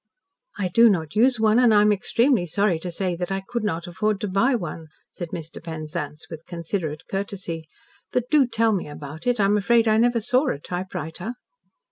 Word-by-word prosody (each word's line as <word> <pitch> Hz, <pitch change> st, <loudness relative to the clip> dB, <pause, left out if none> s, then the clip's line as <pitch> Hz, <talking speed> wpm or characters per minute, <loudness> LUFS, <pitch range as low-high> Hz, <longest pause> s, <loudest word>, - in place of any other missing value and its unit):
"I 185 Hz, -2 st, -1 dB
do 230 Hz, +5 st, +6 dB
not 165 Hz, -4 st, -1 dB
use 245 Hz, +2 st, +4 dB
one, 220 Hz, +1 st, +4 dB
and 245 Hz, -2 st, +5 dB
I 210 Hz, -1 st, +6 dB
am 210 Hz, -, +4 dB
extremely 225 Hz, 0 st, +2 dB
sorry 190 Hz, 0 st, +1 dB
to 180 Hz, -, -5 dB
say 180 Hz, +1 st, -2 dB
that 180 Hz, +2 st, -3 dB
I 195 Hz, 0 st, -2 dB
could 235 Hz, -2 st, -3 dB
not 170 Hz, -5 st, -2 dB
afford 200 Hz, +3 st, -1 dB
to 210 Hz, -, -1 dB
buy 200 Hz, +8 st, +2 dB
one," 165 Hz, -6 st, -5 dB, 0.2 s
said 175 Hz, -2 st, -6 dB
Mr. 165 Hz, 0 st, -7 dB
Penzance 155 Hz, -2 st, -5 dB
with 160 Hz, 0 st, -10 dB
considerate 170 Hz, -3 st, -4 dB
courtesy, 190 Hz, -5 st, -4 dB, 0.4 s
"but 250 Hz, -1 st, 0 dB
do 290 Hz, -4 st, +5 dB
tell 225 Hz, -1 st, +2 dB
me 190 Hz, -, -2 dB
about 145 Hz, -, -8 dB
it. 245 Hz, -2 st, +2 dB
I 200 Hz, -, +4 dB
am 205 Hz, +1 st, +3 dB
afraid 230 Hz, +2 st, +3 dB
I 215 Hz, 0 st, +4 dB
never 240 Hz, +1 st, +3 dB
saw 250 Hz, +5 st, +1 dB
a -, -, 0 dB
typewriter." 180 Hz, +5 st, -5 dB
195 Hz, 200 wpm, -24 LUFS, 165-225 Hz, 0.4 s, do